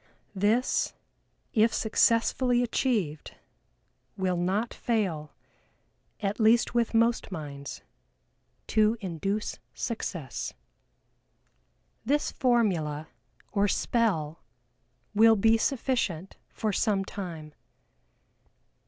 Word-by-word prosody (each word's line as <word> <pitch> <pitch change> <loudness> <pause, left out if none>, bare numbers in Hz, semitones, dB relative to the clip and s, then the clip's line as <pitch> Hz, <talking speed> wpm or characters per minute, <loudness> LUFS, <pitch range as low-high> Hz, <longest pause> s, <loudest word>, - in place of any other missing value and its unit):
This, 215 +6 +1 0.6
if 225 0 +4
successfully 240 +3 +2
achieved, 215 - -1 0.8
will 185 -2 0
not 190 +6 0
fail 185 -10 -1 0.9
(at 205 +1 -2
least 230 +2 +4
with 235 -1 +1
most 230 -1 +2
minds) 145 -5 -7 0.8
to 215 +1 +2
induce 195 +2 -3 0.2
success. 175 - -4 1.5
This 290 +5 +1
formula, 175 - +1 0.4
or 205 0 +2
"spell," 185 -8 0 0.7
will 225 +2 +6
be 225 +2 +4
sufficient 225 - -1
for 215 -2 -2
some 195 -1 +1
time. 165 -7 -7
210 Hz, 80 wpm, -28 LUFS, 175-230 Hz, 1.5 s, will